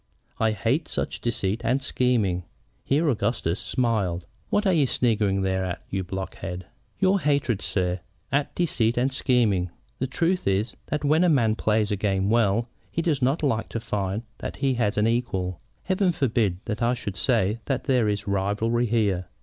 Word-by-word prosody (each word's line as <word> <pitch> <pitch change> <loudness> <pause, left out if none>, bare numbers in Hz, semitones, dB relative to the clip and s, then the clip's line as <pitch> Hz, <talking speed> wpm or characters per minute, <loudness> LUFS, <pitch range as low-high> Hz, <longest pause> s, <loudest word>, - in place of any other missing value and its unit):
I 110 -1 +2
hate 115 - 0
such - - -3
deceit 110 -2 -1
and 125 +4 +2
scheming." 110 -10 +1 0.4
Here 150 +4 +2
Augustus 105 - 0
smiled. 105 -9 0 0.2
"What 210 - +1
are 190 - +4
you 150 -5 +3
sniggering 105 -6 +1
there 95 0 0
at, 90 -2 -4
you 95 -1 -1
blockhead?" 95 -1 -5 0.3
"Your 195 0 +3
hatred, 140 - +1
sir, 90 -1 -1 0.3
at 140 +1 0
deceit 120 -9 +1
and 130 +2 +1
scheming. 115 -10 +2 0.3
The 130 - 0
truth 175 +7 0
is 100 +4 +1
that 150 -1 -2
when 155 +4 +4
a 180 - +4
man 120 -8 +3
plays 110 -1 +1
a - - +2
game 95 0 +1
well, 115 0 +3 0.2
he 165 - -1
does 150 -5 +1
not 135 +5 +1
like 115 -6 0
to 115 - -3
find 105 -2 -2 0.2
that - - -5
he 135 -1 +1
has 110 -4 0
any 110 +2 +3
equal. 95 -7 -3 0.2
Heaven 190 -1 +2
forbid 110 - +1
that 105 +1 -3
I 120 +1 +2
should 100 -5 -5
say 110 -1 +1
that 130 - -1
there 125 -6 +2
is 105 +1 -2
rivalry 105 +5 +1
here. 100 -6 +1
115 Hz, 175 wpm, -25 LUFS, 100-130 Hz, 0.4 s, are